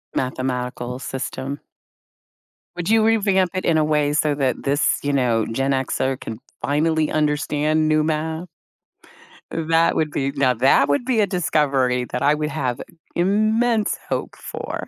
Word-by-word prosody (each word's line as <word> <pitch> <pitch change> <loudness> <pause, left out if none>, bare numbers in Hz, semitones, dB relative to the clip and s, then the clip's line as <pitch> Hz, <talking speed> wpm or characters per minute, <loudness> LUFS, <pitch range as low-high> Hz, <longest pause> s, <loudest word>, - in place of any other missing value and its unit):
Mathematical 125 -1 -3
system? 135 +2 -5 1.2
Would 175 +1 -3
you 225 0 +4
revamp 195 -5 +2
it 185 - -3
in 160 -2 +3
a 155 - +3
way 150 -1 +1
so 150 0 +2
that 135 -3 -1
this, 140 +1 +2
you 145 - 0
know, 120 -5 +2
Gen 135 +4 -1
Xer 130 0 -1
can 110 0 -7 0.2
finally 155 +1 +1
understand 155 0 +1
new 155 0 +3
math? 160 +2 -2 1.0
That 165 0 +2
would 155 -2 0
be 140 -1 -1
Now, 135 -3 +2
that 135 +4 +3
would 145 +12 +1
be 255 -4 +1
a 205 - +3
discovery 140 -8 +1
that 125 - -2
I 145 +2 +4
would 150 0 -2
have 130 -6 -2 0.3
immense 215 +4 +2
hope - - -3
for. - - -6
150 Hz, 150 wpm, -21 LUFS, 135-165 Hz, 1.2 s, you